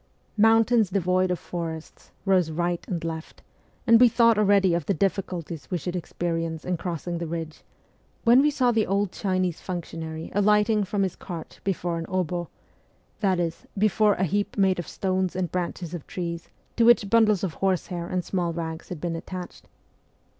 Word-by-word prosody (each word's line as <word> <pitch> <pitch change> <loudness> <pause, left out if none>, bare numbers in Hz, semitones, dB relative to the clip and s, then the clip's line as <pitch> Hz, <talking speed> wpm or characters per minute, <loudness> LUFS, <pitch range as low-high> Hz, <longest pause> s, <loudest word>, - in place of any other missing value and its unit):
Mountains 225 0 +4
devoid 185 -1 +1
of 180 - 0
forests 165 -2 -7 0.2
rose 185 -4 +3
right 175 +2 -1
and 170 -3 -3
left, 160 -1 -6 0.4
and 230 0 +6
we 245 - +8
thought 230 0 +4
already 200 -3 +4
of 170 -4 -1
the 200 - +1
difficulties 170 -6 -2
we 180 - 0
should 175 +2 -4
experience 165 -2 -3
in 180 - 0
crossing 170 0 -4
the 170 - -3
ridge, 160 -1 -5 0.6
when 240 +2 +6
we 295 - +4
saw 255 -4 +2
the 225 -2 +1
old 200 0 0
Chinese 185 -4 -1
functionary 165 -3 -5
alighting 210 +1 +3
from 195 +1 -1
his 190 - -2
cart 170 -4 -8
before 175 -3 -1
an 165 - -5
060 180 -2 -2 0.7
that 190 -4 +1
is, 165 -1 -3
before 210 0 +3
a 185 - -1
heap 205 +5 -1
made 190 -2 +3
of 175 - -5
stones 185 -1 -1
and 180 -3 -2
branches 180 -1 -3
of 170 -4 -7
trees 170 -2 -5 0.3
to 235 - +3
which 235 -3 +6
bundles 215 -4 +4
of 180 -5 -1
horsehair 180 -2 -1
and 180 -1 -2
small 175 -3 -1
rags 165 -1 -5
had 180 - -6
been 170 +1 -2
attached. 180 +2 -8
180 Hz, 175 wpm, -25 LUFS, 170-200 Hz, 0.7 s, we